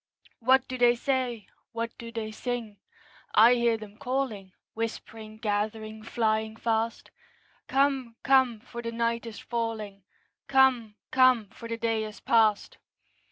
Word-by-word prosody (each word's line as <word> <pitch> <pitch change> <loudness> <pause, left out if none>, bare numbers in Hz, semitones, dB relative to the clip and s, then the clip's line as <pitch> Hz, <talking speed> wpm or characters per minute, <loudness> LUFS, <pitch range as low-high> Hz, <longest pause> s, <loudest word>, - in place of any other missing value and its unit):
What 260 +2 +4
do 255 0 -5
they 240 0 +5
say? 245 -3 -1 0.3
What 230 0 -4
do 230 -1 -8
they 225 -2 -4
sing? 230 -2 -4 0.6
I 230 +3 +8
hear 235 -2 +2
them 215 -1 -12
calling, 250 -8 -2 0.2
Whispering, 220 -1 -6
gathering, 215 0 -2
flying 220 -1 -1
fast, 225 0 -2 0.6
'Come, 270 -4 +1
come, 260 -5 +3
for 235 0 -8
the 230 0 -4
night 230 0 -1
is 225 - -8
falling; 220 -4 -4 0.5
Come, 260 -5 +3 0.2
come, 255 -5 +4
for 230 - -9
the 230 - -2
day 225 -1 0
is 215 -1 -8
past!' 220 -3 +2
230 Hz, 135 wpm, -28 LUFS, 220-245 Hz, 0.6 s, I